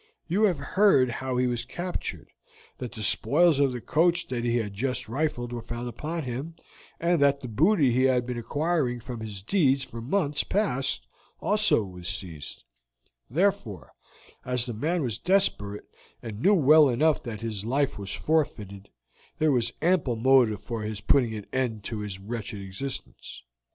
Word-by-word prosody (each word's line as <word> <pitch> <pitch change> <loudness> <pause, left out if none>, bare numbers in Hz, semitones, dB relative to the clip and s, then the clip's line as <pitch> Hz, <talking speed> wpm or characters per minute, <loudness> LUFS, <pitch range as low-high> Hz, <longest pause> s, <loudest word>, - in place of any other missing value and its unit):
You 195 +6 +3
have 185 -6 +2
heard 140 -3 +3
how 130 +1 -3
he 125 - +2
was 120 -1 -1
captured, 175 +8 -5 0.5
that 125 -2 -5
the 110 -3 -5
spoils 155 - +4
of 140 -2 +3
the 125 - -4
coach 175 +5 +2
that 120 -2 -2
he 120 0 +1
had 105 -4 -3
just 125 +5 -2
rifled 120 -1 -2
were 120 - -4
found 120 +2 -6
upon 155 +8 -4
him, 135 +6 -5 0.4
and 170 -2 +1
that 140 0 +3
the 125 - -6
booty 145 - +3
he 130 +2 +3
had 125 -2 +2
been 125 -1 -4
acquiring 145 -1 -1
from 120 0 -7
his 105 -4 -7
deeds 140 - +2
for 115 -3 -8
months 145 +2 0
past 135 - -1 0.3
also 210 - +3
was 90 -2 -8
seized; 85 -6 -5 0.7
therefore, 170 - -1 0.5
as 125 -1 0
the 120 - -4
man 160 +9 -1
was 120 -5 -2
desperate, 170 - +1 0.4
and 110 -2 -7
knew 205 +7 +5
well 155 -2 +6
enough 150 +5 +2
that 110 -3 -7
his 110 -3 -4
life 135 +1 0
was 100 -1 -5
forfeited, 105 -10 -2 0.5
there 155 -1 +3
was 120 -3 +1
ample 165 -8 +2
motive 120 -3 +3
for 115 -2 -4
his 105 -1 -4
putting 120 -1 +2
an 105 -2 -7
end 120 -5 -1
to 110 +1 -4
his 105 -3 -5
wretched 105 +2 -6
existence. 100 - -7
125 Hz, 170 wpm, -27 LUFS, 110-155 Hz, 0.7 s, well